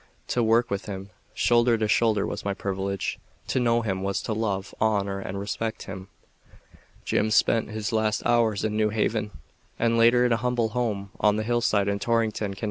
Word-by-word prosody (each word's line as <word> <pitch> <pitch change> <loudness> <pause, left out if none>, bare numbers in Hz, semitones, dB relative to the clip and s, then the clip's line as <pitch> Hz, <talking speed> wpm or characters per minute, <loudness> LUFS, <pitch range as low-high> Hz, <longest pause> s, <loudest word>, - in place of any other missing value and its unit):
To 120 - +1
work 115 +1 +2
with 100 +1 -3
him 95 -1 -7 0.2
shoulder 120 0 +3
to 110 -1 0
shoulder 105 -1 +2
was - - -5
my 100 -1 -2
privilege. 100 0 -3 0.3
To - - +1
know 120 -1 +2
him, 95 -4 -2
was 100 0 -1
to 110 - -2
love, 100 -3 -2
honor 100 -3 +1
and 95 0 -5
respect 110 +2 -3
him. 95 -1 -8 1.0
Jim 110 - +1
spent 110 +1 +2
his 110 +1 -3
last 110 -1 0
hours 115 -4 +2
in 110 -1 -1
New 110 0 +2
Haven, 105 0 -1 0.5
and 115 0 +2
later 120 +2 +5
in 120 - +1
a - - +2
humble 120 -1 0
home 110 -4 -2
on 105 -1 +3
the 110 - -1
hillside 110 -3 +1
in 100 0 0
Torrington, 110 -3 0
Conn. - - -13
110 Hz, 190 wpm, -26 LUFS, 100-115 Hz, 1.0 s, later